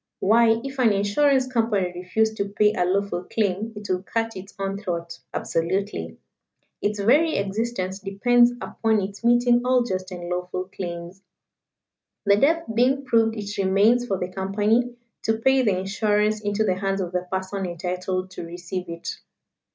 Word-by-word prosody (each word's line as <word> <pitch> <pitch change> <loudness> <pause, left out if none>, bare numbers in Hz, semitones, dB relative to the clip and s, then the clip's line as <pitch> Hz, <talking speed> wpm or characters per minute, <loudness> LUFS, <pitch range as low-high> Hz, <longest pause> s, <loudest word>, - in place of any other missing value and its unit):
Why, 225 +2 +4
if 270 0 -6
an 235 -4 +5
Insurance 260 +7 +2
Company 225 -7 0
refused 200 +5 0
to 200 0 -1
pay 210 +1 +3
a 180 -3 +1
lawful 190 -1 0
claim 210 +1 -1
it 205 0 -8
would 185 +1 -2
cut 225 0 -1
its 190 +2 -9
own 195 0 -3
throat 170 -4 -4
absolutely. 190 +5 -2 0.6
Its 210 0 -1
very 290 +11 +4
existence 200 -1 -2
depends 240 +5 +3
upon 220 -1 0
its 200 +2 -5
meeting 240 0 +4
all 250 0 +3
just 185 -5 -3
and 175 -2 -7
lawful 180 +1 -3
claims. 175 0 -6 1.0
The 200 0 +5
death 325 +8 +3
being 260 +4 +2
proved 225 -3 +3
it 205 -1 -5
remains 205 +6 +3
for 195 - 0
the 180 0 -3
Company 210 +6 0 0.3
to 220 0 0
pay 265 +3 +3
the 205 -7 +2
insurance 210 +2 +1
into 205 +1 0
the 185 -4 +1
hands 195 0 -1
of 180 -2 -3
the 180 0 -2
person 190 0 -2
entitled 185 +2 -3
to 180 - -7
receive 175 +2 -6
it. 170 0 -7
200 Hz, 160 wpm, -24 LUFS, 185-225 Hz, 1.0 s, an